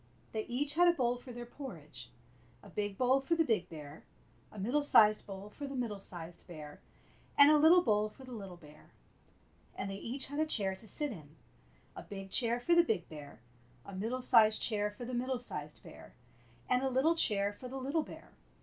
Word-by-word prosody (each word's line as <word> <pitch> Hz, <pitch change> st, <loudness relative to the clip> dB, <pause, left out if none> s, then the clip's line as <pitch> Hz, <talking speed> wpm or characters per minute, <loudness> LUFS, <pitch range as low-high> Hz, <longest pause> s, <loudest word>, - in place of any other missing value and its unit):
They 220 Hz, -1 st, -3 dB
each 275 Hz, +4 st, -1 dB
had 350 Hz, +3 st, +5 dB
a 345 Hz, -, +6 dB
bowl 245 Hz, -5 st, 0 dB
for 250 Hz, +1 st, -11 dB
their 240 Hz, 0 st, -7 dB
porridge 165 Hz, -, -9 dB, 0.3 s
— 120 Hz, 0 st, -30 dB
a 200 Hz, -, -13 dB
big 205 Hz, +1 st, -3 dB
bowl 260 Hz, +2 st, +3 dB
for 305 Hz, +5 st, +1 dB
the 325 Hz, -, +3 dB
big 220 Hz, -, 0 dB
bear, 150 Hz, -1 st, -10 dB, 0.5 s
a -, -, -13 dB
middle 245 Hz, +10 st, 0 dB
sized 215 Hz, -6 st, +5 dB
bowl 200 Hz, +1 st, -8 dB
for 285 Hz, +4 st, -7 dB
the 275 Hz, -, -6 dB
middle 230 Hz, -5 st, -3 dB
sized 175 Hz, -3 st, -9 dB
bear, 150 Hz, -4 st, -10 dB, 0.6 s
and 285 Hz, +1 st, +9 dB
a 305 Hz, -, +6 dB
little 340 Hz, +4 st, +7 dB
bowl 210 Hz, -3 st, +2 dB
for 265 Hz, -, -15 dB
the 255 Hz, -, -11 dB
little 195 Hz, -6 st, -8 dB
bear. 150 Hz, -2 st, -17 dB, 0.8 s
And 195 Hz, 0 st, -4 dB
they 195 Hz, -, -5 dB
each 250 Hz, +7 st, -2 dB
had 285 Hz, +2 st, -5 dB
a 310 Hz, -, +3 dB
chair 195 Hz, -9 st, +1 dB
to 205 Hz, +4 st, -15 dB
sit 295 Hz, +7 st, -3 dB
in 155 Hz, -7 st, -11 dB, 0.3 s
— -, -, -32 dB
a -, -, -7 dB
big 195 Hz, -1 st, -9 dB
chair 235 Hz, 0 st, +2 dB
for 340 Hz, +8 st, +2 dB
the 340 Hz, -, +8 dB
big 210 Hz, -, -1 dB
bear, 145 Hz, -7 st, -11 dB, 0.4 s
a 200 Hz, -, -9 dB
middle 230 Hz, +7 st, -3 dB
sized 220 Hz, -4 st, +5 dB
chair 210 Hz, -2 st, +1 dB
for 210 Hz, +4 st, -9 dB
the 250 Hz, -, -6 dB
middle 255 Hz, +1 st, -1 dB
sized 150 Hz, -11 st, -7 dB
bear, -, -, -13 dB, 0.5 s
and 250 Hz, 0 st, +2 dB
a 265 Hz, -, 0 dB
little 265 Hz, +6 st, +3 dB
chair 205 Hz, -10 st, +2 dB
for 250 Hz, -, -9 dB
the 265 Hz, +2 st, -6 dB
little 280 Hz, +5 st, 0 dB
bear. -, -, -11 dB
225 Hz, 215 wpm, -33 LUFS, 190-265 Hz, 0.8 s, and